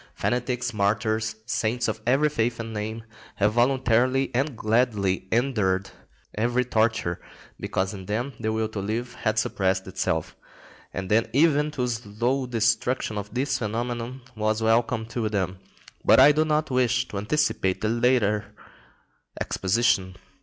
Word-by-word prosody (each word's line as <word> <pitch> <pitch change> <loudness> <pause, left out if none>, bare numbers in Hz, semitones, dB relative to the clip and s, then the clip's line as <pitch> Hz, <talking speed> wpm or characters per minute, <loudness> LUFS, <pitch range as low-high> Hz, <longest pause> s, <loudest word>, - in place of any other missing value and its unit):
Fanatics, 125 0 -1
martyrs, 110 +1 0
saints 120 +1 -1
of 110 0 -3
every 135 +5 +4
faith 120 -5 -1
and 115 -1 -5
name, 110 +2 -4 0.3
have 105 +1 +2
voluntarily 130 +1 +2
and 135 0 -1
gladly 105 -5 +1
endured 105 -6 +1 0.4
every 120 +3 +1
torture, 110 -7 0 0.4
because 95 +1 -2
in 95 -2 -9
them 120 +6 -2
the 110 -1 -1
will 110 0 0
to 110 -2 -6
live 115 +5 -3
had 110 -2 -1
suppressed 95 -3 0
itself; 95 0 -2 0.6
and 95 +1 -5
then 115 +2 +3
even 150 +1 +3
the 130 -4 -2
slow 120 +3 -1
destruction 115 0 0
of 100 0 -4
its 135 0 0
phenomenon 120 +3 -3
was 110 0 0
welcome 115 0 +2
to 115 -1 -2
them. 95 -3 -2 0.4
But - - +6
I 140 +3 +9
do 155 +2 +2
not 155 -1 0
wish 125 0 +2
to 100 - -4
anticipate 100 -5 0
the 110 - 0
later 115 -3 +1 0.8
exposition. 95 -2 +1
115 Hz, 140 wpm, -25 LUFS, 105-125 Hz, 0.8 s, I